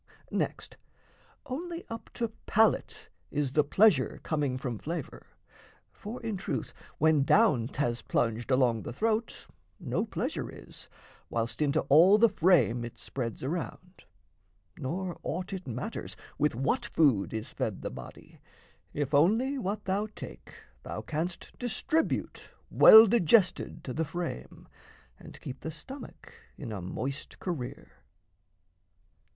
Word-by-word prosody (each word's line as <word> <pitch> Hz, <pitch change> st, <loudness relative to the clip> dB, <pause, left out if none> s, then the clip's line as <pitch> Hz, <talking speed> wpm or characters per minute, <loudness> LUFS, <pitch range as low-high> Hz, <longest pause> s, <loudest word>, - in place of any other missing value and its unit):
Next, -, -, -3 dB, 0.7 s
only 335 Hz, +6 st, -5 dB
up 230 Hz, 0 st, -8 dB
to 235 Hz, -2 st, -1 dB, 0.2 s
palate 220 Hz, +1 st, +2 dB, 0.2 s
is 145 Hz, -3 st, -1 dB
the 150 Hz, +2 st, +3 dB
pleasure 160 Hz, -2 st, +3 dB
Coming 145 Hz, -5 st, -1 dB
from 125 Hz, -4 st, -4 dB
flavour; 165 Hz, -2 st, -6 dB, 0.6 s
for 220 Hz, +4 st, -8 dB
in 220 Hz, -3 st, -2 dB
truth 195 Hz, -, -4 dB, 0.2 s
when 160 Hz, -2 st, +4 dB
down 140 Hz, -, +4 dB
'Thas 120 Hz, -3 st, -2 dB
plunged 115 Hz, +1 st, -1 dB
along 125 Hz, -4 st, +3 dB
the -, -, -6 dB
throat, 220 Hz, -, -1 dB, 0.3 s
no -, -, -1 dB
pleasure -, -, -3 dB
is, -, -, -13 dB, 0.4 s
Whilst 115 Hz, +1 st, -2 dB
into 150 Hz, +1 st, +2 dB
all 165 Hz, +9 st, +6 dB
the 230 Hz, +1 st, +6 dB
frame 140 Hz, -, +3 dB
it 120 Hz, -, -8 dB
spreads 120 Hz, -4 st, -5 dB
around; 180 Hz, +4 st, -5 dB, 0.7 s
Nor 175 Hz, +6 st, -4 dB
aught 185 Hz, +3 st, -4 dB
it 185 Hz, -4 st, -6 dB
matters 125 Hz, 0 st, -5 dB, 0.2 s
with 150 Hz, -4 st, +2 dB
what 135 Hz, +3 st, 0 dB
food 130 Hz, -11 st, +2 dB
is 110 Hz, -1 st, -5 dB
fed -, -, -3 dB
The -, -, -3 dB
body, 65 Hz, -1 st, -11 dB, 0.6 s
if 145 Hz, 0 st, -2 dB
only 225 Hz, -, +3 dB
what 210 Hz, -1 st, -3 dB
thou 195 Hz, +3 st, 0 dB
take -, -, -10 dB, 0.3 s
thou -, -, -6 dB
canst 165 Hz, +3 st, -4 dB
Distribute 245 Hz, +7 st, -1 dB, 0.2 s
well 220 Hz, +1 st, +10 dB
digested 195 Hz, -3 st, +3 dB
to 125 Hz, -, -5 dB
the 160 Hz, -, 0 dB
frame 160 Hz, -, -6 dB, 0.5 s
And -, -, -12 dB
keep 130 Hz, 0 st, -7 dB
the 160 Hz, -, -5 dB
stomach 270 Hz, -, -11 dB, 0.2 s
in 125 Hz, -7 st, -6 dB
a 100 Hz, -3 st, -5 dB
moist 135 Hz, +10 st, -5 dB
career. 155 Hz, -10 st, -5 dB
155 Hz, 130 wpm, -29 LUFS, 130-205 Hz, 0.7 s, well